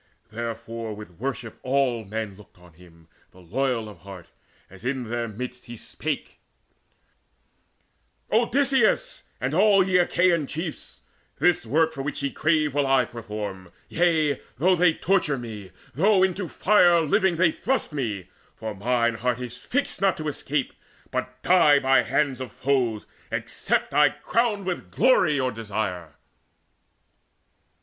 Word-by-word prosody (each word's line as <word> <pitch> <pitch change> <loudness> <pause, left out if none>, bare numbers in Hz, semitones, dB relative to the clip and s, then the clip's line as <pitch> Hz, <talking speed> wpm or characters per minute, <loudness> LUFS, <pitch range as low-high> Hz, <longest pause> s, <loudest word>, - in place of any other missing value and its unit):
Therefore 115 -1 -5
with 105 -5 -12
worship 125 -3 -5
all 130 -3 +1
men 105 -1 -5
looked 105 -2 -18
on 90 -1 -18
him, 85 -1 -19 0.2
The 95 - -19
loyal 115 +5 -1
of 105 - -12
heart, 95 -3 -11 0.4
as 95 +2 -15
in 130 0 -2
the 120 0 -2
midst 125 +3 -7
he 120 0 -9
spake: - - -5 1.9
"Odysseus, 265 - +2 0.2
and - - -2
all 200 -3 +5
ye 180 -1 +4
Achaean 170 -3 +2
chiefs, 160 +2 -6 0.4
This 175 -9 +2
work 160 +6 +2
for 135 - -5
which 140 0 -4
ye 140 - -1
crave 155 -2 +1
will 145 -1 +1
I 135 -2 +4
perform 105 -6 -7 0.2
Yea, 160 -5 +2 0.2
though 185 +6 +4
they 170 -2 +3
torture 175 -7 +1
me, 110 -5 -8 0.2
though 190 +5 +4
into 190 0 0
fire 175 -2 +4
Living 190 +3 +2
they 170 -1 +3
thrust 250 -2 -2
me; 105 - -3 0.3
for 110 -1 -5
mine 120 +3 +1
heart 125 +2 -1
is 125 -1 -6
fixed 245 - -2
Not 195 -2 +2
to 155 - -4
escape, 145 -1 -2 0.4
but 130 0 -4
die 165 -5 +6
by 135 -1 +4
hands 135 -4 0
of 130 - -6
foes, 125 -6 0 0.3
Except - - -2
I - - +6
crown 225 -4 -1
with 180 -1 -4
glory 210 - +3
your 130 -2 0
desire." 100 - -4
130 Hz, 140 wpm, -25 LUFS, 110-170 Hz, 1.9 s, die